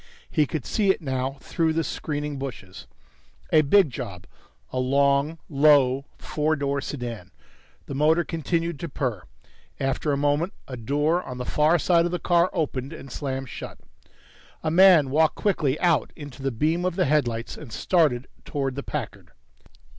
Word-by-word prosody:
He 150 -2 +2
could 150 -4 -4
see 205 -3 +1
it 190 - +3
now 135 -3 -3
through 165 -2 0
the 165 +1 0
screening 150 -2 -4
bushes 100 - -8 0.7
a 155 - +7
big 155 +1 +4
job, 100 -9 -7 0.5
a - - -1
long, 140 +4 +2
low 140 -2 +4
four 155 +1 -1
door 140 -1 -1
sedan. 120 -10 -6 0.6
The - - -6
motor 155 +5 +3
continued 165 -1 -2
to 170 - -5
purr. 125 -8 -2 0.6
After 135 +2 -1
a 140 - +1
moment, 145 +6 +1
a 130 - -6
door 145 +8 0
on 125 -7 -8
the 125 - -4
far 155 +6 +3
side 170 +1 +3
of 175 - -1
the 180 - -1
car 175 0 +2
opened 140 -3 -2
and 135 -4 -10
slammed 135 -2 -4
shut. - - -8 0.9
A 155 - 0
man 170 -6 +6
walked 155 +2 +3
quickly 155 -8 0
out 170 -4 +2
into 145 -2 -10
the 135 - 0
beam 155 +9 0
of 180 -2 -1
the 185 -1 +2
headlights 120 -6 0
and 145 -7 -11
started 145 - +2 0.2
towards 135 -3 -3
the 140 - -3
Packard. 100 - -6
145 Hz, 165 wpm, -25 LUFS, 130-160 Hz, 0.9 s, a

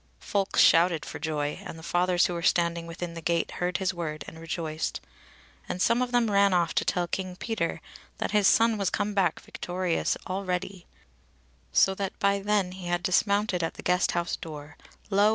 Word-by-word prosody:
Folk 200 -1 -2
shouted 165 -1 +5
for - - -7
joy, 150 -1 -2
and 185 -4 -8
the 160 - -11
fathers 175 +1 +2
who 180 - -1
were 170 - -3
standing 170 0 +1
within 170 0 -6
the 165 - -7
gate 170 +1 0
heard 180 0 0
his 190 -1 -1
word 155 -3 -4
and 160 - -10
rejoiced, 160 -1 -3 0.7
and 180 - -3
some 230 +6 +3
of 250 -1 -1
them 240 -3 +2
ran 200 -1 +4
off 170 -2 +1
to - - +1
tell 175 -1 0
King 185 +1 -4
Peter 225 +4 -2 0.4
that - - -2
his 210 -2 +4
son 225 -1 +4
was 195 -2 +1
come 205 0 -1
back 185 -5 +1
victorious 180 -1 -2
already; 185 -1 -3 0.8
so 190 - +4
that 195 0 -4
by 200 0 +2
then 200 -2 +1
he 185 -1 -8
had 175 0 -1
dismounted 200 0 +2
at 165 - -2
the - - -9
Guest 180 0 +2
house 170 0 -1
door, 150 -2 -9 0.4
lo! 200 +2 +5
180 Hz, 190 wpm, -27 LUFS, 170-200 Hz, 0.8 s, shouted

